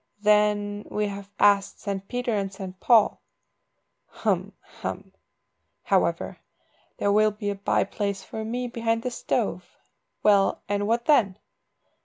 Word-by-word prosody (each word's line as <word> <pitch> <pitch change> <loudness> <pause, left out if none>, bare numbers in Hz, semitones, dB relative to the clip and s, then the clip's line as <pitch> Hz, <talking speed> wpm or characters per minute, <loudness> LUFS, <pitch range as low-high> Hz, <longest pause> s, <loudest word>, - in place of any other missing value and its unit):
"Then 210 0 +2
we 210 - -1
have 200 0 -8
asked 200 -1 +3
St. 195 -1 -4
Peter 245 0 -2
and 195 -1 -1
St. 190 -1 -8
Paul." 225 -2 +4 0.9
"Hem! - - -1 0.3
hem! - - -5 0.7
However, - - 0 0.6
there 200 - +1
will 215 +1 +5
be 210 -1 -4
a - - -4
bye 195 0 +1
place 200 -1 -3
for 220 +3 -6
me 245 +3 -3
behind 230 -1 -1
the 250 - -2
stove. - - -2 0.5
Well, 200 -2 +3
and 205 0 -1
what 235 +2 +1
then?" 210 -11 +3
205 Hz, 135 wpm, -25 LUFS, 200-225 Hz, 0.9 s, will